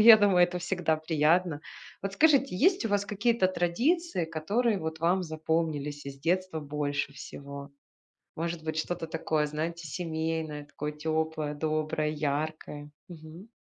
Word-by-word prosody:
Я 220 0 +11
думаю, 200 -4 +5
это 180 0 -3
всегда 175 -3 0
приятно. 160 +1 +2 0.4
Вот 195 0 -2
скажите, 280 - +4
есть 370 - +3
у 225 - +1
вас 205 0 +1
какие-то 210 -1 +2
традиции, 235 - +1
которые 200 +8 0
вот 160 -1 -4
вам 180 +3 +3
запомнились 155 -3 -2
из 140 0 -7
детства 175 +2 0
больше 145 -1 -2
всего? 140 +1 -8 0.7
Может 165 0 -3
быть, 155 0 -3
что-то 165 +1 -2
такое, 160 -1 0
знаете, 160 +2 -3
семейное, 160 -2 -3
такое 150 +1 -5
тёплое, 155 0 -1
доброе, 155 0 0
яркое? 150 0 -3 0.2
Мгм. 165 +4 -11
160 Hz, 135 wpm, -29 LUFS, 150-185 Hz, 0.7 s, Я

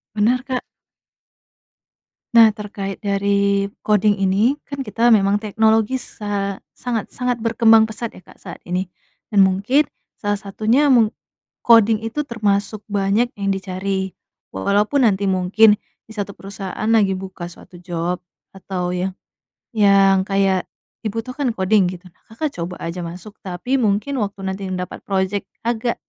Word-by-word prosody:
Bener, 225 +4 +3
Kak. 260 -1 -2 1.7
Nah, 230 -2 +8
terkait 200 -2 -5
dari 200 0 +1 0.2
koding 210 -1 +3
ini, 195 +8 +2
kan 280 -1 -5
kita 235 0 +3
memang 200 -1 +3
teknologi 220 +3 +2
sa 200 -3 -4 0.2
sangat-sangat 245 +1 -2
berkembang 225 -1 +5
pesat 220 +1 -6
ya, - - -13
Kak, - - -18
saat - - -9
ini 180 +1 -2 0.4
dan 205 -2 +5
mungkin 205 +11 +2 0.3
salah 205 -1 -1
satunya 220 +8 +1
meng 230 -5 +5 0.5
koding 225 -2 +6
itu 225 +6 -2
termasuk 210 -3 -1
banyak 205 +4 +1
yang 200 -1 -1
dicari. 190 0 -3 0.4
Walaupun 210 - +2
nanti 200 -2 +2
mungkin 195 +3 +4 0.3
di - - -14
1 205 -1 -3
perusahaan 195 +1 -6
lagi 215 -4 +4
buka 185 -2 -7
suatu 175 - -15
job 175 0 -3 0.3
atau 180 -2 -3
yang 185 +1 -1 0.6
yang 195 -2 +5
kayak 195 -2 +1 0.4
dibutuhkan 235 +5 -2
koding 190 0 +3
gitu. 180 0 -9
Nah, 170 - -34
Kakak 285 +7 -3
coba 175 +2 -4
aja 170 +2 -4
masuk, 180 +5 -9
tapi 195 +8 -2
mungkin 225 +5 0
waktu 200 -2 -3
nantinya 190 -1 -3
dapat - - -10
project 195 0 -1 0.2
agak 235 0 -1
200 Hz, 135 wpm, -20 LUFS, 190-225 Hz, 1.7 s, Nah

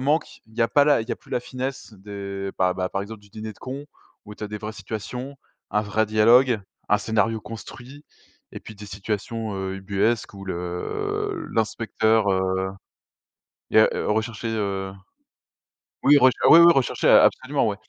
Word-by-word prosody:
manque, 145 +5 0
il 110 - -21
y 120 - +2
a 115 - +2
pas 145 -2 +4
la 145 -6 +3
il 115 - -12
y - - -1
a - - -4
plus - - -22
la 125 - 0
finesse 130 0 -6
des, 100 -1 -6
bah, 90 -1 +2 0.2
par 95 - -2
exemple 110 +1 -9
du 105 - -20
Dîner 110 +1 -7
de - - -24
Cons, 135 +3 -7 0.4
où 105 - -9
tu - - -12
as 105 - -6
des 105 - -5
vraies 110 +1 -6
situations, 115 +6 -6 0.3
un 105 - +1
vrai 110 +1 0
dialogue, 115 +2 +4 0.3
un 105 - +5
scénario 110 0 0
construit 125 +6 -10 0.5
et - - -8
puis 110 - -11
des 105 - -10
situations, 105 +2 -4
heu, 95 0 -3
ubuesques 100 +4 -1
où 95 - -9
le 90 -1 -3
l'inspecteur, 110 -1 +1
heu, 95 0 0 1.1
il - - +3
y - - +10
a - - +5
heu, - - -3
recherché 110 +1 -2
heu, 100 -3 -2 1.1
oui 145 +1 +7
rech 130 -1 +6
ah - - +7
oui, 165 - +10
oui, 170 0 +8
recherché, 135 -5 +1
a - - +8
absolument 135 -3 +1
ouais. 100 - -2
110 Hz, 190 wpm, -24 LUFS, 100-125 Hz, 1.1 s, y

